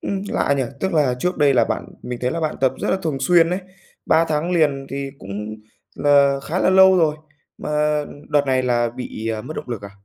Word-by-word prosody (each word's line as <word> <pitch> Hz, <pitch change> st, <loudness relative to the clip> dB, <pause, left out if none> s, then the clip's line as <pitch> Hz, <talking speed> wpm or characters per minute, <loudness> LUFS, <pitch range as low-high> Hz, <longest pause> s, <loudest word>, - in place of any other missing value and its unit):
ừm, 195 Hz, -1 st, -3 dB
lạ 140 Hz, -, +1 dB
nhỉ. 135 Hz, -, +1 dB, 0.2 s
Tức 190 Hz, -1 st, -1 dB
là 145 Hz, -6 st, +2 dB
trước 180 Hz, +6 st, -1 dB
đây 140 Hz, -2 st, +4 dB
là 120 Hz, -, +4 dB
bạn -, -, -3 dB, 0.2 s
mình 125 Hz, -1 st, -5 dB
thấy 125 Hz, -, 0 dB
là 165 Hz, -, -3 dB
bạn 155 Hz, -1 st, -2 dB
tập 130 Hz, -1 st, +3 dB
rất -, -, -1 dB
là -, -, +2 dB
thường 150 Hz, -5 st, -2 dB
xuyên 170 Hz, +3 st, +4 dB
ấy, 180 Hz, +2 st, -1 dB, 0.5 s
3 165 Hz, +1 st, +4 dB
tháng 155 Hz, +3 st, -1 dB
liền 145 Hz, -5 st, +1 dB
thì 140 Hz, 0 st, -4 dB
cũng 105 Hz, +3 st, -6 dB, 0.4 s
là 140 Hz, -1 st, +4 dB
khá 175 Hz, -, -2 dB
là 185 Hz, -, +3 dB
lâu 190 Hz, 0 st, +7 dB
rồi, 155 Hz, -3 st, +2 dB, 0.4 s
mà -, -, -5 dB, 0.6 s
đợt 145 Hz, -1 st, +2 dB
này 130 Hz, -1 st, +2 dB
là 120 Hz, -1 st, +1 dB
bị, 115 Hz, -2 st, -6 dB
à, 110 Hz, -1 st, -2 dB
mất 155 Hz, +7 st, -8 dB
động -, -, -6 dB
lực 115 Hz, -4 st, -5 dB
à? 100 Hz, -, -8 dB
140 Hz, 235 wpm, -21 LUFS, 125-165 Hz, 0.6 s, lâu